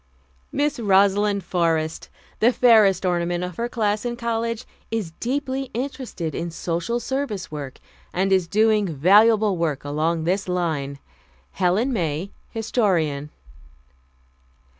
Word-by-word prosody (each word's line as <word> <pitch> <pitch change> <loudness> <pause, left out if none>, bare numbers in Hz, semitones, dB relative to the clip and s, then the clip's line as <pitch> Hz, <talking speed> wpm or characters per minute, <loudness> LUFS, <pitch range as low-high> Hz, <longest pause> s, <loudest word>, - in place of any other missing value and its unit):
"Miss 295 -1 0
Rosalind 200 -1 +3
Forrest, 165 -3 -1 0.3
the 235 +3 +5
fairest 215 -7 +5
ornament 175 0 0
of 180 -1 -6
her 235 +1 -2
class 210 -3 0
in 240 -1 -2
college, 230 0 -2 0.2
is 220 -7 -3
deeply 270 +1 -2
interested 245 - -4
in 170 - -3
Social 170 +7 -2
Service 235 - -3
work, 145 -3 -6 0.3
and 190 +2 0
is 185 -3 +2
doing 215 +1 +3
valuable 205 +6 +4
work 160 -5 -1
along 160 +3 0
this 190 +4 0
line." 155 -6 -1 0.5
"Helen 200 +9 +1
May, 170 -2 -2 0.2
Historian." 175 - 0
195 Hz, 120 wpm, -23 LUFS, 170-230 Hz, 0.5 s, the